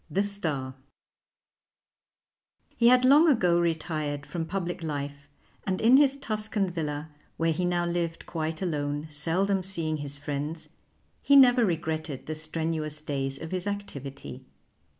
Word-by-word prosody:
THE 195 +6 +1
STAR 155 -10 -3 2.0
He 235 - +4
had 250 +1 +6
long 290 +6 +7
ago 180 - +4
retired 155 -4 -2
from 160 +3 -4
public 175 -1 -3
life, 145 -2 -5 0.3
and 190 -2 -1
in 240 +4 +6
his 280 -1 +4
Tuscan 215 -6 -2
villa, 155 -2 -4 0.3
where 165 0 +2
he 180 +3 -1
now 175 -1 +1
lived 170 -1 -2
quite 160 +1 -3
alone, 145 -3 -2
seldom 180 +6 +1
seeing 165 -4 0
his 145 -1 -5
friends, 145 +3 -5 0.5
he 280 - +4
never 250 -3 +7
regretted 160 - -2
the 155 - -3
strenuous 155 -1 -3
days 135 -3 -3
of 160 - -7
his 185 +1 -3
activity. 140 -10 -6
165 Hz, 135 wpm, -27 LUFS, 150-195 Hz, 2.0 s, long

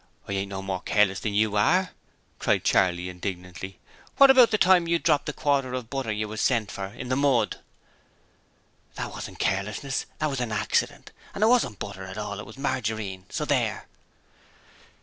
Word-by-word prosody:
'I - - -6
ain't 100 0 -2
no 95 -1 -5
more 95 -1 -3
careless 100 -2 +2
than 105 -2 -3
you 105 0 +2
are,' 175 - +3 0.5
cried - - +1
Charley, 90 -1 +2
indignantly. 90 0 -6 0.4
'What 275 -1 +9
about 255 -3 +7
the 215 - +2
time 180 -3 +5
you 170 0 +3
dropped 145 -3 +1
the - - 0
quarter 135 -3 0
of 125 -2 -6
butter 135 -5 -2
you 105 0 -2
was 110 +1 -4
sent 115 -5 +1
for 95 -1 -5
in 125 +5 -8
the 130 - +1
mud?' 140 -3 +2 1.4
'That - - -4
wasn't - - -8
carelessness: 105 +8 -2
that 155 -1 -1
was 135 - -3
an 120 -2 -2
accident, 105 - -1 0.2
and 205 - 0
it - - +6
wasn't 230 - +3
butter 95 -1 -7
at 95 +1 -8
all: 105 -1 -4
it 105 - -8
was 110 - -12
margarine, 110 -8 -3
so - - -3
there!' - - 0
110 Hz, 185 wpm, -26 LUFS, 100-140 Hz, 1.4 s, What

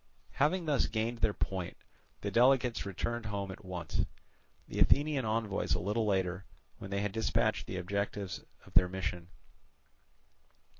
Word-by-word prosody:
Having 165 +5 +2
thus 150 -3 +2
gained 115 +2 -1
their 110 -1 +3
point, 95 -3 -3 0.4
the 100 - -2
delegates 125 -1 +4
returned 115 +4 -2
home 100 -2 -3
at - - -10
once; 90 -2 -2 0.6
the - - -4
Athenian 145 -3 +4
envoys 110 -2 0
a - - -1
little 105 +3 0
later, 95 -2 +1 0.4
when 95 - -7
they 100 0 0
had 105 -1 -1
dispatched 110 +2 +1
the 95 - -4
objects 100 +1 -2 0.2
of - - -16
their 90 - +6
mission. 90 -2 -3
105 Hz, 145 wpm, -33 LUFS, 95-115 Hz, 0.6 s, their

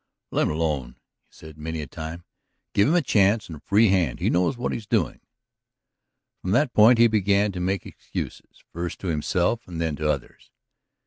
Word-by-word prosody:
"Let - - +1
him - - -1
alone," 75 -6 -2 0.3
he - - -27
said 80 -1 -13
many 80 +1 -4
a 75 - -4
time. 80 +5 -7 0.5
"Give 100 - +4
him 160 - +3
his 175 - +3
chance 105 -2 +3
and 80 - -7
a - - -14
free 105 +7 +3
hand. 90 -10 +1
He - - +1
knows 90 +8 +1
what 120 - -2
he - - -2
is 105 - -14
doing." 100 - 0 1.2
From 90 - -4
that 145 0 +2
point 115 +3 +7
he 120 - +6
began 105 -2 +2
to 90 - -6
make 95 +1 -1
excuses, - - -8
first 85 +1 -4
to 95 - -3
himself 90 +8 0
and 85 -2 -6
then 80 -2 -1
to 75 +1 -1
others. 70 -4 -4
90 Hz, 200 wpm, -24 LUFS, 80-105 Hz, 1.2 s, point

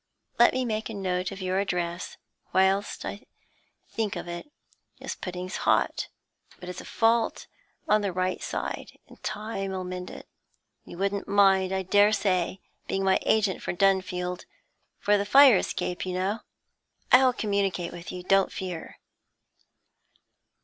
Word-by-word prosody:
Let 240 - +7
me 255 0 0
make 220 -1 -2
a 220 - -6
note 185 -1 -2
of 195 -1 -7
your 185 +1 0
address 175 -3 -3 0.4
whilst 190 +2 +2
I - - -7 0.6
think 220 -3 -2
of - - -6
it. 175 +12 -7 0.5
This - - -4
pudding's 180 0 -5
hot, - - +1 0.5
but 180 - -10
it's 180 - -6
a - - -12
fault 230 0 +1 0.4
on 215 0 +4
the 200 -2 -1
right 185 +1 -1
side, - - -5
and - - -17
time 200 -3 -4
'll 185 - -3
mend 180 0 -6
it. - - -10 0.6
You - - -10
wouldn't 200 +1 -1
mind, 195 -2 +4
I 190 0 -1
daresay, 200 -2 +2 0.3
being 195 - -1
my 190 0 +3
agent 215 -3 +2
for - - -3
Dunfield 180 -1 0 0.5
for 205 0 +2
the - - +1
fire 265 +2 +7
escape, 180 -1 -2
you 185 -1 -3
know? 195 +4 -1 0.7
I'll 255 0 +7
communicate 200 -6 -1
with 175 0 -8
you, 180 -1 -7
don't 195 +1 +3
fear.' 180 -3 -6
190 Hz, 150 wpm, -27 LUFS, 180-205 Hz, 0.7 s, Let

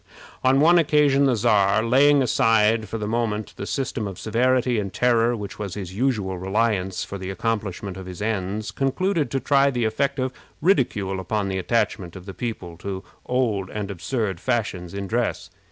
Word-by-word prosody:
On 130 +1 +4
one 170 +4 +6
occasion 145 -3 +4
the 130 -3 +3
Czar, 105 -2 +3
laying 135 +4 +5
aside 115 -4 +3
for 115 - -3
the 105 - -3
moment 110 -2 -2
the 100 - -6
system 130 -5 -2
of 95 -3 -7
severity 125 +2 +1
and 100 -2 -3
terror 120 +1 +2
which 105 -2 -7
was 100 -4 -4
his 95 -3 -6
usual 105 -5 -1
reliance 95 -1 0
for 100 - -7
the 95 0 -5
accomplishment 100 -2 -3
of 95 -1 -8
his 90 -1 -8
ends, 105 -1 -2
concluded 155 +4 0
to 135 - -1
try 140 +2 +3
the 120 -4 -1
effect 135 +6 0
of 130 -1 -1 0.3
ridicule 105 - +1
upon 100 +2 -2
the 95 0 -1
attachment 100 -4 -1
of 90 -1 -10
the 95 - -7
people 95 -8 -5
to 95 +1 -5 0.2
old 115 -7 0
and 105 -2 -4
absurd 95 +1 -2
fashions 95 -5 -2
in 100 0 -3
dress. 120 +4 -2
110 Hz, 180 wpm, -23 LUFS, 95-125 Hz, 0.3 s, one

